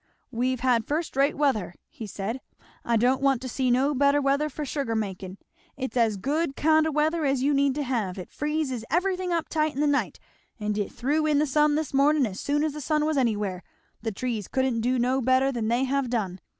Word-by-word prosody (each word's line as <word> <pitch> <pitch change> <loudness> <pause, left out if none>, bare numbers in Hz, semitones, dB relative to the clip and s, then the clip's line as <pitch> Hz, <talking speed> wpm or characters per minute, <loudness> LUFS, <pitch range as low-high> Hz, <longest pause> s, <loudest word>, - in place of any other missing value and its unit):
"We've 250 +1 -1
had 245 -3 +2
first 310 +1 -2
rate 275 +2 +2
weather," 260 -12 0
he 220 - -9
said; 205 +6 -4 0.4
"I 235 -1 +1
don't 250 +4 +2
want 275 -2 +3
to - - -4
see 255 +1 -1
no 265 +4 +2
better 280 +1 +3
weather 280 +2 +1
for 300 +1 -5
sugar 275 -5 -2
makin'; 195 -3 -4 0.4
it's 265 -1 -4
as 225 -4 +2
good 280 - -1
kind 315 +1 +3
o' - - -1
weather 310 +2 +1
as 270 -2 +1
you 290 +1 +2
need 280 -1 +2
to 295 - -1
have. 225 -8 -2
It 180 - -8
friz 295 -5 -2
everythin' 365 +1 0
up 335 -2 0
tight 310 -1 0
in - - -4
the 300 - +2
night, 290 -1 0 0.4
and 210 0 -2
it 205 -1 -2
thew 295 +6 0
in 300 -1 +3
the 300 - +3
sun 300 +1 +2
this 310 -2 -2
mornin' 280 +1 +4
as 195 -4 -5
soon 295 +1 0
as 310 -2 -1
the 300 - -6
sun 300 +2 +1
was 310 0 0
anywhere; 210 -8 0 0.4
the 225 0 -2
trees 220 -1 -3
couldn't 260 -3 0
do 250 +3 +1
no 255 +2 +1
better 260 +2 +3
than 235 -4 -2
they 240 +3 +1
have 270 -1 0
done. 195 -6 -2
265 Hz, 225 wpm, -26 LUFS, 230-295 Hz, 0.4 s, mornin